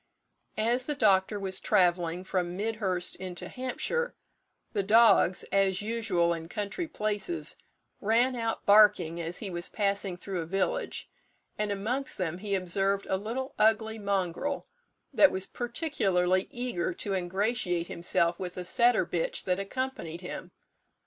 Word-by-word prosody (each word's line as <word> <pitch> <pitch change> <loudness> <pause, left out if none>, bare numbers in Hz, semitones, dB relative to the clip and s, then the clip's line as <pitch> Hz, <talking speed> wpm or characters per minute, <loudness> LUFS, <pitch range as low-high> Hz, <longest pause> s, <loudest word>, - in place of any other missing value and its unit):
As 240 +4 +1
the 295 - -1
doctor 200 -4 +3
was 190 -1 -1
travelling 175 -1 +2
from 180 -2 -2
Midhurst 200 -4 0
into 180 -1 -5
Hampshire, 480 - -2 0.6
the 205 - +1
dogs, 210 -3 +5
as 195 0 +2
usual 210 -7 +1
in 165 -1 -6
country 210 - -3
places, 215 - -2 0.4
ran 235 +5 +2
out 230 -1 -2
barking 190 -5 +5
as 165 +2 -4
he 200 -4 -5
was 175 0 -5
passing 200 -3 -1
through 185 -1 -4
a 160 - -6
village; 195 +2 -1 0.5
and 210 -1 -1
amongst 235 +7 -1
them 180 -1 -2
he 200 0 -1
observed 195 +2 0
a - - +3
little 235 +7 -4
ugly 220 +1 +3
mongrel, 200 +7 -1 0.5
that 295 - +7
was 190 0 -1
particularly 195 - 0
eager 240 -9 -2
to 200 +2 -3
ingratiate 185 -1 0
himself 170 0 0
with 180 -1 -5
a 180 - -4
setter 240 +6 +3
bitch - - -2
that 180 0 0
accompanied 195 -6 -4
him. 180 - -7
200 Hz, 140 wpm, -29 LUFS, 180-225 Hz, 0.6 s, that